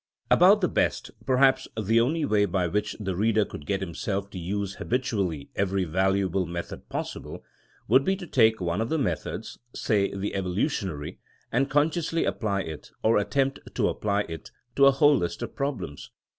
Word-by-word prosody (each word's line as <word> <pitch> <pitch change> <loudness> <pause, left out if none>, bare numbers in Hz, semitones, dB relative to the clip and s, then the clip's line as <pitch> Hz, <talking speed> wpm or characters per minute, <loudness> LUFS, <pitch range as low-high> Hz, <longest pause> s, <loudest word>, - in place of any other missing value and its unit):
About - - +6
the - - +3
best, - - 0 0.2
perhaps 130 0 +4
the 110 +2 +3
only 150 +6 +1
way 105 -5 +3
by 90 -1 0
which 105 +5 -1
the 95 -3 -3
reader 110 +2 +2
could 75 - -10
get 100 -1 0
himself 100 +3 -3
to 95 - -6
use 100 +3 -3
habitually 100 - -2
every 95 -1 0
valuable 95 +1 +1
method 85 0 -6
possible, - - -5 0.4
would 130 +5 +5
be 190 +4 +1
to 190 -2 -8
take 110 -7 +3
one 90 +2 -1
of 115 - -2
the 160 - +1
methods, 140 - -3 0.2
say 100 -3 +1
the 100 +1 -3
evolutionary, 95 - -2 0.3
and 135 +4 +1
consciously 160 +3 +1
apply 100 -4 -1
it, 80 -4 -8
or 110 -1 +4
attempt 135 +7 0 0.2
to - - +2
apply 100 -1 0
it, 80 -5 -7 0.3
to 140 0 +6
a - - +8
whole 145 +1 +5
list 85 +7 -3
of 120 - -6
problems. 140 - -4
105 Hz, 170 wpm, -26 LUFS, 95-130 Hz, 0.4 s, a